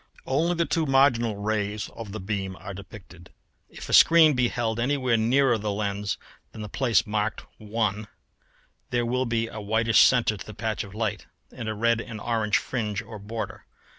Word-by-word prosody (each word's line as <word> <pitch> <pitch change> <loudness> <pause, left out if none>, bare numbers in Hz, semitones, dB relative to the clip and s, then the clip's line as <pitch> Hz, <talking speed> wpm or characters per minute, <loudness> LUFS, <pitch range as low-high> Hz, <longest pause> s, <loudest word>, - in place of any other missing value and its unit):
Only 165 +6 +1
the 170 0 +1
two 165 -2 0
marginal 130 -5 +3
rays 105 0 -2
of 115 -3 -9
the 110 - -5
beam 95 -1 -3
are 100 - -8
depicted. 95 -3 -12 0.4
If - - -10
a - - -4
screen 165 -2 +7
be 125 -2 +2
held 115 -1 -2
anywhere 130 -1 +1
nearer 120 +2 +3
the 105 0 -2
lens 100 0 -2 0.3
than 110 - -8
the 105 - -7
place 120 -1 +2
marked 105 0 -2
1 105 -1 -2 0.8
there 120 -1 0
will 125 +2 0
be 115 -1 0
a 110 - -7
whitish 110 +1 +2
centre 120 -4 +4
to - - -8
the 105 - -9
patch 110 -1 -2
of 100 -1 -12
light 110 -2 -3 0.2
and 110 - -6
a 110 - -3
red 115 +1 +2
and 110 -2 -8
orange 110 -2 +1
fringe 105 -5 -3
or 110 -2 -10
border. 110 +3 -6
110 Hz, 185 wpm, -26 LUFS, 105-120 Hz, 0.8 s, screen